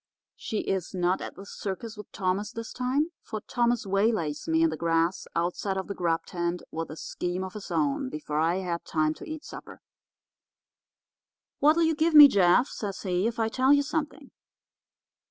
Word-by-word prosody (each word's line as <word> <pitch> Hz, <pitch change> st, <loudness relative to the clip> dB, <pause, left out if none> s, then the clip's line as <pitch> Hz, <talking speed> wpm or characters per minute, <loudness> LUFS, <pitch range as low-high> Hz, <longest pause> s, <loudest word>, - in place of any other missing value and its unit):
She 215 Hz, -, -3 dB
is 190 Hz, 0 st, -3 dB
not 180 Hz, +1 st, +1 dB
at -, -, -7 dB
the 195 Hz, -, -10 dB
circus 205 Hz, +3 st, -6 dB
with 210 Hz, -1 st, -11 dB
Thomas 195 Hz, +2 st, -1 dB
this 230 Hz, -1 st, -7 dB
time, 270 Hz, +6 st, 0 dB
for 215 Hz, -, -6 dB
Thomas 240 Hz, 0 st, 0 dB
waylays 195 Hz, -, 0 dB
me 325 Hz, 0 st, +3 dB
in 330 Hz, -, +3 dB
the -, -, -3 dB
grass 165 Hz, +2 st, 0 dB
outside 180 Hz, +3 st, -1 dB
of 190 Hz, -, -2 dB
the 200 Hz, -, -5 dB
grub 170 Hz, -3 st, -1 dB
tent 175 Hz, 0 st, -3 dB
with 165 Hz, 0 st, -4 dB
a 155 Hz, -, -8 dB
scheme 180 Hz, +3 st, -3 dB
of 190 Hz, 0 st, -6 dB
his 210 Hz, -2 st, -8 dB
own 150 Hz, -6 st, 0 dB
before 150 Hz, +1 st, -3 dB
I 165 Hz, +2 st, +2 dB
had 180 Hz, -3 st, -3 dB
time 155 Hz, -1 st, 0 dB
to -, -, -11 dB
eat 315 Hz, -1 st, -6 dB
supper. -, -, -10 dB, 1.8 s
"'What'll 310 Hz, +4 st, +4 dB
you 320 Hz, 0 st, +3 dB
give 315 Hz, +1 st, +1 dB
me, 295 Hz, -1 st, +12 dB
Jeff,' 200 Hz, +2 st, +4 dB
says 200 Hz, -3 st, -5 dB
he, 185 Hz, +1 st, 0 dB
'if 230 Hz, -, -3 dB
I 225 Hz, -1 st, +1 dB
tell 260 Hz, +4 st, +2 dB
you 285 Hz, 0 st, +5 dB
something? 300 Hz, +1 st, -4 dB
195 Hz, 185 wpm, -27 LUFS, 175-245 Hz, 1.8 s, me